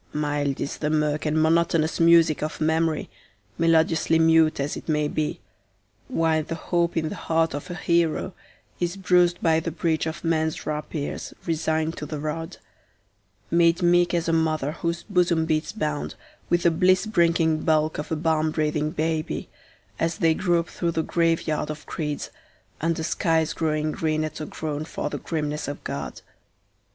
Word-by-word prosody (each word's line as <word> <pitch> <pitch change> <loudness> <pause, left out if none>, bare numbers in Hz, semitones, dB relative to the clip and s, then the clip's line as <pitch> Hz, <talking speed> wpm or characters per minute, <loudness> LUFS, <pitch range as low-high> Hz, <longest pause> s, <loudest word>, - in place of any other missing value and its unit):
Mild 145 -2 -1
is - - -3
the 150 - -1
mirk 150 0 0
and 155 +1 +1
monotonous 165 0 +2
music 165 -2 +5
of 155 +1 -3
memory, 160 0 +1 0.5
melodiously 165 0 +3
mute 160 -1 +4
as 140 +2 -1
it - - -8
may 150 -1 +2
be, 150 0 -2 0.7
While 160 -1 +1
the 165 +2 -5
hope 170 0 0
in 160 -1 0
the - - -5
heart 165 -1 0
of 145 +4 -6
a 175 - -4
hero 170 +1 +1 0.5
is 175 +2 -1
bruised 180 -2 +3
by 160 -1 +4
the 165 - -3
breach 160 0 -1
of 160 +1 -5
men's 160 -1 0
rapiers, 150 -1 -4
resigned 160 0 -1
to 150 - -5
the 155 - -4
rod; 155 +2 -4 0.9
Made 170 +1 +3
meek 175 0 +4
as 170 -1 0
a 165 - +1
mother 155 -3 +1
whose 170 +1 -3
bosom 175 -5 +2
beats 155 +2 0
bound 155 -8 -3 0.3
with 175 0 +2
the 170 - +5
bliss 185 +4 +3
bringing 170 -5 +2
bulk 155 -1 +1
of 150 - -5
a - - +2
balm 160 0 +1
breathing 150 -1 0
baby, 155 0 -2 0.5
As 165 0 0
they 165 -1 +3
grope 170 0 +1
through 170 -1 -2
the 160 - 0
graveyard 165 -3 0
of 155 0 -6
creeds, 150 -3 -4 0.5
under 165 0 0
skies 165 -1 +1
growing 155 -1 0
green 155 0 -1
at 155 0 -5
a 155 - -4
groan 155 -1 -4
for 150 -2 -4
the - - -4
grimness 150 -2 -3
of 145 - -6
God. - - -5
160 Hz, 165 wpm, -24 LUFS, 155-170 Hz, 0.9 s, music